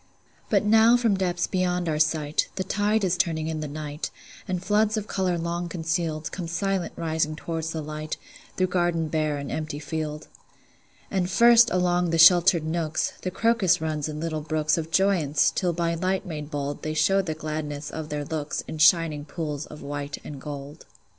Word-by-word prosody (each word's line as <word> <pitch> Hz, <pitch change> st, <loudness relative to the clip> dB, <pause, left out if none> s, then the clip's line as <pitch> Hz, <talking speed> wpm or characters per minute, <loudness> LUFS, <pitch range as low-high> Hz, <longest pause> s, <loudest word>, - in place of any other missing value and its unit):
But -, -, +2 dB
now 225 Hz, +3 st, +6 dB
from 230 Hz, -4 st, +2 dB
depths 180 Hz, -2 st, 0 dB
beyond 180 Hz, -2 st, -1 dB
our 155 Hz, -1 st, 0 dB
sight, 155 Hz, -1 st, +1 dB
The 190 Hz, -, -1 dB
tide 205 Hz, +3 st, +1 dB
is 185 Hz, -2 st, +2 dB
turning 165 Hz, -3 st, 0 dB
in 160 Hz, -1 st, -3 dB
the 155 Hz, -, -3 dB
night, 150 Hz, +1 st, -5 dB, 0.4 s
And 185 Hz, -1 st, -3 dB
floods 215 Hz, +1 st, +2 dB
of 210 Hz, -, -2 dB
color 185 Hz, -4 st, -1 dB
long 170 Hz, +1 st, -3 dB
concealed 165 Hz, -2 st, -2 dB
Come 180 Hz, -3 st, -5 dB
silent 195 Hz, +1 st, -1 dB
rising 160 Hz, -1 st, -1 dB
toward 165 Hz, 0 st, -4 dB
the 160 Hz, -1 st, -3 dB
light, 155 Hz, +1 st, -5 dB, 0.4 s
Through 185 Hz, -, +3 dB
garden 175 Hz, -3 st, +1 dB
bare 155 Hz, -2 st, 0 dB
and 140 Hz, -1 st, -5 dB
empty 155 Hz, -1 st, -3 dB
field. 150 Hz, 0 st, -4 dB, 0.8 s
And 185 Hz, -2 st, 0 dB
first, 235 Hz, +2 st, +6 dB
along 180 Hz, -1 st, +1 dB
the 165 Hz, -, +1 dB
sheltered 175 Hz, 0 st, +7 dB
nooks, 160 Hz, -1 st, -1 dB
The 185 Hz, -, -2 dB
crocus 195 Hz, -3 st, +2 dB
runs 155 Hz, -1 st, -2 dB
in 150 Hz, 0 st, -5 dB
little 155 Hz, -1 st, -3 dB
brooks 155 Hz, 0 st, +1 dB
Of 160 Hz, -1 st, -3 dB
joyance, 175 Hz, -5 st, +2 dB
till 180 Hz, -2 st, 0 dB
by 170 Hz, 0 st, -1 dB
light 185 Hz, +3 st, -1 dB
made 150 Hz, -4 st, -6 dB
bold 145 Hz, -1 st, -4 dB
They 155 Hz, 0 st, -3 dB
show 195 Hz, +5 st, +3 dB
the 160 Hz, -5 st, -4 dB
gladness 150 Hz, -1 st, -5 dB
of 155 Hz, -1 st, -6 dB
their 150 Hz, -1 st, -3 dB
looks 155 Hz, -1 st, -3 dB
In 155 Hz, -, -6 dB
shining 160 Hz, -2 st, +4 dB
pools 150 Hz, -3 st, -4 dB
of 150 Hz, -, -11 dB
white 145 Hz, 0 st, -4 dB
and 140 Hz, -3 st, -8 dB
gold. 145 Hz, +1 st, -8 dB
165 Hz, 185 wpm, -25 LUFS, 155-180 Hz, 0.8 s, sheltered